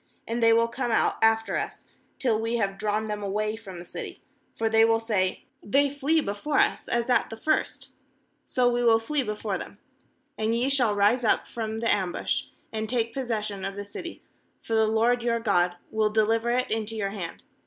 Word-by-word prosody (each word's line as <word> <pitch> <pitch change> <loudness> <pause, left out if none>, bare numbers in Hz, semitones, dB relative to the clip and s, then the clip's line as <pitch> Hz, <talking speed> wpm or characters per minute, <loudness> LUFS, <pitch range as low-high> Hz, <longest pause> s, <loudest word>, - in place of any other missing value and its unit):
6And 235 +1 -2
they 230 0 +6
will 230 0 +4
come 240 +1 -3
out 225 - +2
after 225 0 +3
us, - - -5 0.3
till 225 -4 +1
we 225 +1 -1
have 195 -4 -1
drawn 215 +1 0
them 210 -1 -4
away 210 +2 -1
from 200 -5 -10
the 175 - -9
city; - - -8 0.3
for 225 - 0
they 225 0 +5
will 225 0 +4
say: 205 -5 -1 0.2
They 280 +6 +2
flee 295 +3 +1
before 205 +7 -2
us, - - +2
as 235 0 0
at 245 -3 +2
the 225 - -7
first; 310 +7 -1 0.5
so 250 -2 +1
we 245 0 +1
will 230 -1 +6
flee 275 +6 -1
before 210 -4 -3
them. - - -8 0.6
7And 220 +1 +1
ye 245 +3 +1
shall 245 -7 +2
rise 210 +5 +3
up 220 - +2
from 220 -2 -4
the 230 - +3
ambush, 185 -4 -1 0.3
and 220 -1 -3
take 230 -2 0
possession 215 -7 -3
of 195 0 -3
the 205 0 -5
city; 335 +11 -8 0.4
for 225 - -6
the 220 -1 +4
LORD 230 +3 +2
your 235 -1 +1
God 180 -6 +2 0.2
will 220 -1 +2
de 215 0 +3
liver 225 +2 +1
it 250 +1 0
into 220 0 -2
your 200 -2 -2
hand. 185 -5 -6
225 Hz, 205 wpm, -26 LUFS, 210-235 Hz, 0.6 s, they